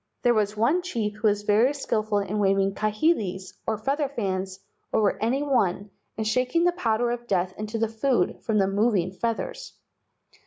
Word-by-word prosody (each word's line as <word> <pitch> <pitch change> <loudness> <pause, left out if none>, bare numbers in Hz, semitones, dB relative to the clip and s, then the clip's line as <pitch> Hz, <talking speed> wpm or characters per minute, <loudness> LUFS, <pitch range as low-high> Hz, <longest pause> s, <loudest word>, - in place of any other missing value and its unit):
There 240 - +5
was 210 -1 0
one 270 +12 +2
chief 230 - -2
who 215 +1 +1
was 205 0 +1
very 225 +7 +3
skilful 215 -6 -1
in 200 +1 -1
waving 195 -1 +2
kahilis, 210 - 0
or 220 - 0
feather 275 +6 -1
fans, 190 -6 -3 0.3
over 210 -2 +2
any 255 +6 +1
one 205 -8 0 0.3
and 220 -1 -1
shaking 255 +9 +1
the 355 - +4
powder 240 -8 0
of 240 0 -5
death 185 -2 0
into 215 +2 -4
the 225 0 +1
food 225 -2 0
from 220 -2 0
the 195 - +4
moving 195 -3 +1
feathers. 230 - -4
215 Hz, 170 wpm, -25 LUFS, 200-245 Hz, 0.3 s, There